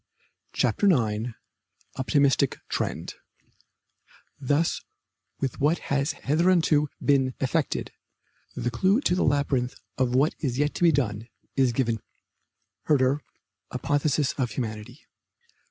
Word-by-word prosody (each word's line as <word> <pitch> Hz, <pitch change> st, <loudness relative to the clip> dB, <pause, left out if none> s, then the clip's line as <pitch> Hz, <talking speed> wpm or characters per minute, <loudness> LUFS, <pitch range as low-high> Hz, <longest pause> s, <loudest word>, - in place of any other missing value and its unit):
CHAPTER 205 Hz, -, +2 dB
IX 115 Hz, -4 st, 0 dB, 0.6 s
OPTIMISTIC 140 Hz, 0 st, +2 dB
TREND -, -, -3 dB, 1.3 s
Thus, 145 Hz, +4 st, +1 dB, 0.6 s
with 135 Hz, -, -3 dB
what 155 Hz, +4 st, +3 dB, 0.2 s
has 140 Hz, +3 st, +1 dB
hitherto 155 Hz, -1 st, +2 dB, 0.2 s
been 135 Hz, -3 st, +3 dB
effected, 140 Hz, +2 st, -1 dB, 0.6 s
the 120 Hz, -, -2 dB
clue 190 Hz, -, +3 dB
to 180 Hz, -, +1 dB
the 180 Hz, -, +1 dB
labyrinth 135 Hz, -3 st, +1 dB, 0.2 s
of 125 Hz, -1 st, +1 dB
what 140 Hz, +4 st, +3 dB
is 130 Hz, -5 st, -2 dB
yet 145 Hz, +1 st, +1 dB
to -, -, -7 dB
be 170 Hz, -, +7 dB
done 115 Hz, -6 st, -1 dB, 0.3 s
is 130 Hz, -2 st, +3 dB
given 115 Hz, -1 st, 0 dB
us. -, -, -21 dB, 0.8 s
HERDER: 140 Hz, 0 st, +3 dB, 0.5 s
Apotheosis 145 Hz, -1 st, 0 dB
of 125 Hz, -2 st, +1 dB
Humanity. 115 Hz, +3 st, -6 dB
135 Hz, 115 wpm, -26 LUFS, 125-150 Hz, 1.3 s, be